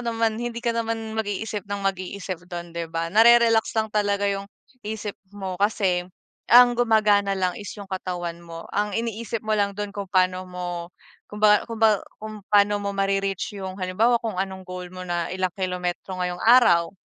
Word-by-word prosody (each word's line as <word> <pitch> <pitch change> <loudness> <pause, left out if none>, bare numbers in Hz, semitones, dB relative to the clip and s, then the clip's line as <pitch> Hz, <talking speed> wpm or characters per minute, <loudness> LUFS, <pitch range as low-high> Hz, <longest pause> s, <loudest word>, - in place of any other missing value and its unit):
naman, 225 -1 +1
hindi 240 0 -4
ka 235 - +1
naman 225 -1 -3
mag-iisip 210 -1 -3
ng 200 0 -4
mag-iisip 185 -2 -3
do'n, 175 -1 -7
'di 170 0 -3
ba, 165 0 -2
na-re-relax 230 +2 +5
lang 220 - +2
talaga 205 -1 +1
yung 200 0 -2 0.4
isip 215 -1 -4 0.2
mo. 190 -2 -4
Kasi, 195 -4 +2 0.5
ang 245 0 +8
gumagana 210 -4 +3
lang 185 -1 0
is 205 - -7
yung 200 - -8
katawan 175 -3 -5
mo, 165 0 -9
ang 210 +1 +1
iniisip 230 +1 -3
mo 215 - +2
lang 205 -1 +1
do'n, 205 -1 -4
kung 200 -2 -6
paano 185 -1 +2
mo 180 0 -5 0.6
kung 210 - -8
ba 210 0 +5
kung 230 -1 -7
ba 215 -3 +4 0.2
kung 215 -1 -8
paano 205 0 +4
mo 200 - -2
ma-re-reach 195 0 -1
yung, 190 -1 -6
halimbawa, 210 +6 +2
kung 225 -4 -4
anong 190 0 -4
goal 180 -1 -7
mo 185 0 -8
na 175 -1 -2
ilang 185 -1 -2
kilometro 180 0 -3
ngayong 180 0 -3
araw, 220 -8 +5
200 Hz, 180 wpm, -24 LUFS, 185-220 Hz, 0.6 s, ang